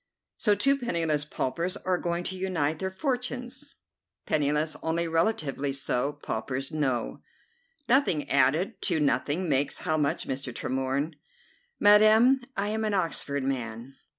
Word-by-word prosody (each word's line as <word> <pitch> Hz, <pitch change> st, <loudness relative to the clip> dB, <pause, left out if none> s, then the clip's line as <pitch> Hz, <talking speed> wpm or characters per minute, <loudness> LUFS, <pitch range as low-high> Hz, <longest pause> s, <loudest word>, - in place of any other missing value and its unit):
"So 210 Hz, -3 st, +3 dB
two 275 Hz, +7 st, +2 dB
penniless 165 Hz, -, 0 dB
paupers 170 Hz, +7 st, -2 dB
are 185 Hz, -2 st, -1 dB
going 170 Hz, 0 st, -2 dB
to 190 Hz, -, -4 dB
unite 165 Hz, -5 st, -1 dB
their 190 Hz, -, -2 dB
fortunes!" 250 Hz, +4 st, -4 dB, 0.5 s
"Penniless, 150 Hz, +1 st, +1 dB
only 165 Hz, +1 st, 0 dB
relatively 160 Hz, -5 st, 0 dB
so; 135 Hz, 0 st, 0 dB
paupers, 130 Hz, +5 st, -3 dB
no." 135 Hz, -6 st, -1 dB, 0.7 s
"Nothing 240 Hz, -, +3 dB
added 140 Hz, +7 st, +2 dB
to 170 Hz, -4 st, +1 dB
nothing 150 Hz, +4 st, 0 dB
makes 140 Hz, -1 st, 0 dB
how 155 Hz, -, +1 dB
much, 145 Hz, -2 st, 0 dB
Mr. 135 Hz, -1 st, -3 dB
Tremorne?" 135 Hz, +5 st, -2 dB, 0.6 s
"Madam, 215 Hz, +5 st, +6 dB, 0.2 s
I 200 Hz, +1 st, 0 dB
am 220 Hz, +1 st, -1 dB
an 210 Hz, -2 st, 0 dB
Oxford 150 Hz, -6 st, -1 dB
man." 125 Hz, -1 st, -4 dB
160 Hz, 130 wpm, -28 LUFS, 140-205 Hz, 0.7 s, Madam